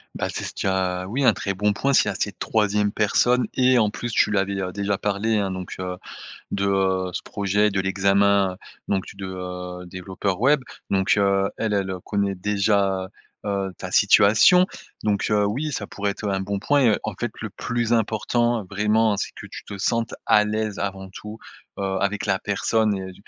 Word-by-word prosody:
Bah, -, -, -2 dB
c'est -, -, -4 dB
ce -, -, -6 dB
tu -, -, -4 dB
as, 95 Hz, -1 st, 0 dB
oui, 135 Hz, +4 st, 0 dB
un -, -, +6 dB
très 100 Hz, -, -3 dB
bon 105 Hz, +2 st, +1 dB
point, 140 Hz, +6 st, 0 dB
s'il -, -, +5 dB
y -, -, 0 dB
a -, -, -7 dB
cette -, -, -3 dB
3e 105 Hz, -1 st, +1 dB
personne 125 Hz, +4 st, +2 dB
et 130 Hz, 0 st, +4 dB
en 110 Hz, -3 st, +3 dB
plus, 120 Hz, +3 st, -5 dB
tu -, -, +3 dB
lui 105 Hz, -, +1 dB
avais, 100 Hz, 0 st, -1 dB
heu, 90 Hz, 0 st, -3 dB
déjà 100 Hz, 0 st, -1 dB
parlé, 105 Hz, +2 st, 0 dB
hein, 100 Hz, -2 st, -1 dB
donc 95 Hz, -1 st, -6 dB
heu, 90 Hz, 0 st, -4 dB, 0.5 s
de 100 Hz, 0 st, -1 dB, 0.5 s
ce -, -, -3 dB
projet, 100 Hz, +1 st, +1 dB
de 95 Hz, -1 st, 0 dB
l'examen, 100 Hz, 0 st, +2 dB, 0.3 s
donc 95 Hz, -2 st, 0 dB
tu -, -, -11 dB
de, 95 Hz, -, -7 dB
heu, 90 Hz, -1 st, -6 dB
développeur 90 Hz, +1 st, -3 dB
web, 140 Hz, +5 st, +4 dB, 0.3 s
donc 95 Hz, 0 st, +3 dB
heu, 100 Hz, -1 st, +2 dB
elle 110 Hz, -2 st, -1 dB
elle 95 Hz, -2 st, 0 dB
connaît 100 Hz, -1 st, -1 dB
déjà, 100 Hz, -1 st, +1 dB, 0.4 s
heu, 100 Hz, -2 st, -1 dB
ta -, -, -6 dB
situation, 110 Hz, -, +6 dB, 0.4 s
donc 105 Hz, 0 st, 0 dB
heu, 105 Hz, -1 st, +3 dB
oui, 140 Hz, +8 st, -2 dB
ça 100 Hz, -5 st, -3 dB
pourrait 100 Hz, 0 st, -2 dB
être, 105 Hz, -, -7 dB
heu, 100 Hz, -, 0 dB
un 95 Hz, -, 0 dB
bon 100 Hz, +1 st, -2 dB
point 145 Hz, +7 st, +2 dB
et -, -, +1 dB
en 110 Hz, -, -3 dB
fait, 115 Hz, +3 st, -4 dB
le 110 Hz, -, -4 dB
plus 120 Hz, +2 st, -1 dB
important, 115 Hz, +1 st, +1 dB
vraiment, 105 Hz, +1 st, +2 dB
c'est -, -, -3 dB
que -, -, -9 dB
tu -, -, -10 dB
te 100 Hz, -, -8 dB
sentes 115 Hz, +3 st, 0 dB
à 105 Hz, -, +5 dB
l'aise 110 Hz, -1 st, -2 dB
avant 95 Hz, -1 st, -4 dB
tout, 105 Hz, +3 st, -9 dB, 0.4 s
heu, -, -, -3 dB, 0.2 s
avec 100 Hz, +2 st, -1 dB
la 95 Hz, -1 st, +2 dB
personne 105 Hz, +2 st, +1 dB
et 95 Hz, -1 st, -5 dB
100 Hz, 205 wpm, -23 LUFS, 95-110 Hz, 0.5 s, un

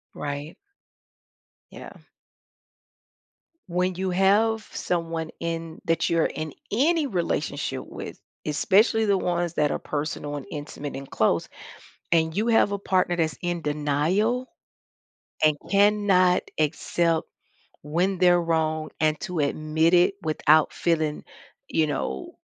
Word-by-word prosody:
Right. 145 Hz, +2 st, -5 dB, 1.2 s
Yeah. -, -, -11 dB, 1.7 s
When 180 Hz, +1 st, 0 dB
you 190 Hz, +1 st, -2 dB
have 210 Hz, +4 st, +2 dB
someone 165 Hz, -2 st, -2 dB
in 165 Hz, -1 st, -4 dB
that 165 Hz, 0 st, +1 dB
you're 165 Hz, -1 st, +2 dB
in 155 Hz, -2 st, -4 dB, 0.2 s
any 305 Hz, +7 st, +2 dB
relationship 180 Hz, -9 st, -2 dB
with, -, -, -8 dB, 0.3 s
especially 215 Hz, +8 st, +3 dB
the 200 Hz, -1 st, +3 dB
ones 175 Hz, -2 st, -1 dB
that 150 Hz, -3 st, +1 dB
are -, -, -1 dB
personal 145 Hz, -1 st, -4 dB
and 140 Hz, -, -7 dB
intimate 145 Hz, -1 st, -6 dB
and 135 Hz, 0 st, -7 dB
close, 85 Hz, -6 st, +1 dB, 0.6 s
and 160 Hz, -1 st, +2 dB
you 215 Hz, +3 st, 0 dB
have 225 Hz, -3 st, +3 dB
a 200 Hz, -, -1 dB
partner 185 Hz, -3 st, +1 dB
that's 160 Hz, -2 st, 0 dB
in 175 Hz, -1 st, -2 dB
denial, 155 Hz, -, 0 dB, 1.0 s
and 155 Hz, -1 st, +5 dB, 0.2 s
cannot 200 Hz, -3 st, +4 dB, 0.2 s
accept 160 Hz, +2 st, +1 dB, 0.6 s
when 175 Hz, +6 st, 0 dB
they're 175 Hz, -1 st, +4 dB
wrong 160 Hz, -2 st, 0 dB
and 155 Hz, -1 st, +1 dB
to 175 Hz, -3 st, -4 dB
admit 155 Hz, +3 st, +1 dB
it 180 Hz, +3 st, +4 dB
without 155 Hz, 0 st, +3 dB
feeling, 155 Hz, -3 st, 0 dB, 0.4 s
you 160 Hz, -, +1 dB
know, 65 Hz, -, -3 dB
165 Hz, 120 wpm, -25 LUFS, 155-185 Hz, 1.7 s, and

